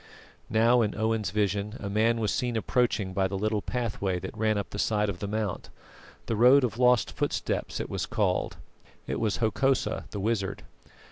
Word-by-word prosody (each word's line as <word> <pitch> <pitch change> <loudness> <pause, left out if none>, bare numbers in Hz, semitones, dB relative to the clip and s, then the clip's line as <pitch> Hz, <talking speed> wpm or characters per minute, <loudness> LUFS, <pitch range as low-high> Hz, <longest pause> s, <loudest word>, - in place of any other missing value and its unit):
Now, 115 +2 +4
in 105 -2 0
Owen's 110 -2 0
vision 105 +2 -1
a 100 - -5
man 110 +3 +2
was 110 -2 0
seen 125 -3 -1
approaching 110 -4 0
by 95 0 +1
the 95 +1 -4
little 105 +1 0
pathway 105 -7 -2
that 90 - -7
ran 110 -1 +1
up 100 - -4
the 100 - -5
side 105 -1 +1
of 90 -3 -5
the 100 - -3
mount 105 -2 -3 0.6
the 115 - -1
Road 125 +5 +6
of 120 -1 -2
Lost 125 -2 +4
Footsteps - - -2
it - - -3
was - - -3
called. - - 0 0.5
It - - -3
was 110 -3 0
Hokosa 130 +4 0
the 105 - -5
wizard. 100 -2 -1
110 Hz, 185 wpm, -28 LUFS, 100-115 Hz, 0.6 s, Road